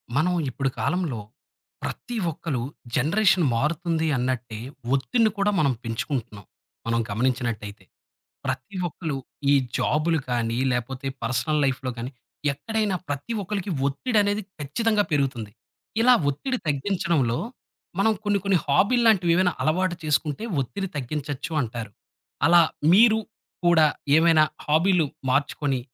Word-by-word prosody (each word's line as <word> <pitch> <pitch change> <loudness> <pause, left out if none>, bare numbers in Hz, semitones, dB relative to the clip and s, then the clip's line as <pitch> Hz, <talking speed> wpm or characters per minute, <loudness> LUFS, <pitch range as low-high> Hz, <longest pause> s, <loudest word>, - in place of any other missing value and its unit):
మనం 175 +5 +2 0.2
ఇప్పుడు 135 +2 -1
కాలంలో 175 -8 -1 0.7
ప్రతి 245 - -5 0.2
ఒక్కళు 145 -5 -3 0.3
జనరేషన్‌ 180 +5 +3
మారుతుంది 160 +4 0
అన్నట్టే 120 -3 -2 0.4
ఒత్తిడిని 220 - +2
కూడా 200 +1 +2
మనం 140 -4 +3
పెంచుకుంటున్నాం 115 -3 -4 0.4
మనం 115 0 +1
గమనించినట్టయితే. 115 -3 -2 0.6
ప్రతి 130 +7 -4
ఒక్కళు 160 -3 -4 0.3
ఈ - - +6 0.2
జాబులు 160 +2 +1
కానీ 115 -1 0
లేపోతే, 130 +3 -3 0.2
పర్సనల్ 130 +6 0
లైఫ్‌లో 130 -1 -1
కాని, 120 +3 -5 0.4
ఎక్కడైనా 210 +6 -1
ప్రతి 145 - -3
ఒక్కళకి 195 0 -3 0.2
ఒత్తిడనేది 205 - +1 0.2
ఖచ్చితంగా 210 - +1
పెరుగుతుంది. 130 -8 -1 0.5
ఇలా 250 +2 +7 0.2
ఒత్తిడి 255 - -2
తగ్గించడంలో, 150 - 0 0.6
మనం 220 +2 +4
కొన్ని 205 -1 +1
కొన్ని 195 -2 +4
హాబీల్లాంటివి 200 - +4
ఏవైనా 180 -1 +3
అలవాటు 175 +3 +1
చేసుకుంటే 150 +3 0 0.2
ఒత్తిడి 195 +9 -4
తగ్గించొచ్చు 145 +2 -4
అంటారు. 115 -2 -6 0.6
అలా 170 +1 +7 0.3
మీరు 220 +2 +6 0.5
కూడా 170 -2 +6 0.3
ఏమైనా 160 -1 +5 0.2
హాబీలు 165 +2 +3 0.2
మార్చుకొని, 140 0 0
150 Hz, 110 wpm, -25 LUFS, 130-190 Hz, 0.7 s, ఇలా